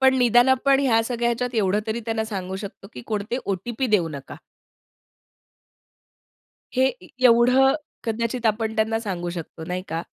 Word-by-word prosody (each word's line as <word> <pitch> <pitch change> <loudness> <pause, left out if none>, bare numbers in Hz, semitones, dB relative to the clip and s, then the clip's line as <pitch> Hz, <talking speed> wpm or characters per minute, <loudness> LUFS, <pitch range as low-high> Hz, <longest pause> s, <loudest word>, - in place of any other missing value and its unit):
पण 265 0 +5
निदान 245 +1 +5
आपण 270 +1 +3
ह्या 230 -5 +3
सगळ्या 235 0 -1
ह्याच्यात 245 +1 -2
एवढं 210 -1 +2
तरी 220 +2 -2
त्यांना 220 -1 -1
सांगू 190 -3 -5
शकतो 195 0 -10
की - - -8
कोणते 215 +3 -2
ओ-टी-पी 220 +7 -2
देऊ 195 -7 +2
नका. 140 -3 -8 2.4
हे 260 +1 +4 0.2
ए 180 - -13 0.2
एवढं, 250 +4 +5 0.3
कदाचित 230 +1 -2
आपण 220 0 0
त्यांना 220 +1 +1
सांगू 180 -5 -4
शकतो 165 -1 -7
नाही 180 +2 -4
का. 165 +1 -3
225 Hz, 155 wpm, -23 LUFS, 195-245 Hz, 2.4 s, पण